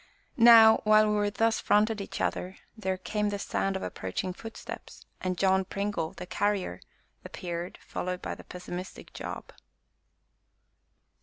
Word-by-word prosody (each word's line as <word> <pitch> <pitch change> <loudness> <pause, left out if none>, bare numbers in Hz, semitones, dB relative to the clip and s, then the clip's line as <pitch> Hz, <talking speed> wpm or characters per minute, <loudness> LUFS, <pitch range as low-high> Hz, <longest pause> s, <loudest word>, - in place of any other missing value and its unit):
Now, 230 -2 +9
while 215 0 +5
we 205 0 +1
thus 225 +2 +1
fronted 215 0 +2
each 195 - -6
other, 185 +1 -2 0.2
there 190 -4 -2
came 210 +2 -1
the 205 - -2
sound 195 -1 -1
of 190 - -3
approaching 95 - -4
footsteps, 225 +4 -9 0.2
and 185 -1 -2
John 190 0 +3
Pringle, 195 -4 -3
the 180 - -8
Carrier, 190 - -1 0.4
appeared, 175 0 -5
followed 180 0 -3
by - - -4
the - - -11
pessimistic 180 +1 -8
Job. - - -7
195 Hz, 135 wpm, -29 LUFS, 180-215 Hz, 0.4 s, Now